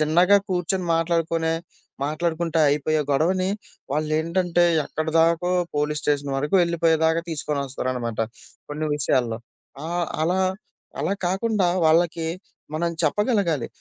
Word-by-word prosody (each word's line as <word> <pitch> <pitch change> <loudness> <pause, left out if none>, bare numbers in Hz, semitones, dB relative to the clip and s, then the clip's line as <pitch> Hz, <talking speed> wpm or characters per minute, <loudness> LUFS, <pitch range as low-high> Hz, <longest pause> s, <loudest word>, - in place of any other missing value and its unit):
చిన్నగా 175 +6 +5
కూర్చొని 180 0 -1
మాట్లాడుకునే 165 -1 0 0.5
మాట్లాడుకుంటే 165 +1 -1
అయిపోయే 150 +2 +1
గొడవని 185 +6 +1 0.4
వాళ్ళేంటంటే 165 +4 +1 0.2
ఎక్కడిదాకో 165 +2 +1 0.3
పోలీస్ 150 0 0
స్టేషన్ 145 -1 0
వరకు 150 +6 -2
వెళ్ళిపోయేదాకా 165 -1 +2
తీసుకొని 150 -2 -2
వస్తారనమాట. 125 -4 -3 0.5
కొన్ని 155 +1 -2
విషయాల్లో 120 -5 0 0.5
ఆహ్, 175 0 -1 0.2
అలా, 175 +4 +1 0.6
అలా 190 - 0
కాకుండా 195 +1 +1 0.2
వాళ్ళకి 165 +1 +3 0.5
మనం 170 +2 0
చెప్పగలగాలి 180 - +1
165 Hz, 100 wpm, -23 LUFS, 150-175 Hz, 0.6 s, చిన్నగా